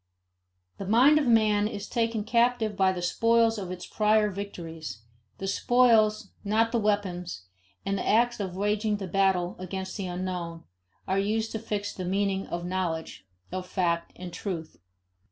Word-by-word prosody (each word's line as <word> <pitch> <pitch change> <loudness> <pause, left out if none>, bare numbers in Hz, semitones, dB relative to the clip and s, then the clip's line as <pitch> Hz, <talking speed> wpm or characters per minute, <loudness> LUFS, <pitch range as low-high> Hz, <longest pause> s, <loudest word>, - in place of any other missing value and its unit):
The 195 - -5
mind 260 +8 +6
of 290 - 0
man 215 -3 +4
is 205 -1 -6
taken 230 -2 0
captive 235 -2 +2
by 190 -1 +3
the 180 -2 -4
spoils 230 +4 +3
of 190 -3 -5
its 180 0 -6
prior 215 -1 +2
victories; 165 - -7 0.3
the 195 - -5
spoils, 215 -1 +3
not 220 +2 +2
the 235 - +1
weapons 185 - -1 0.4
and 195 0 0
the - - -3
acts 240 +2 +3
of 190 -3 -3
waging 210 +2 0
the 200 - -5
battle 185 -1 +1
against 190 +1 -5
the 195 -3 -3
unknown, 175 -2 -4 0.4
are 190 +1 +1
used 220 +3 0
to 220 - -3
fix 205 -1 -3
the 185 - -5
meaning 195 +1 0
of 175 0 -4
knowledge, 170 - -3 0.2
of 185 0 -4
fact, 170 -3 0
and 180 -1 -8
truth. 170 -6 -5
200 Hz, 160 wpm, -27 LUFS, 180-220 Hz, 0.4 s, mind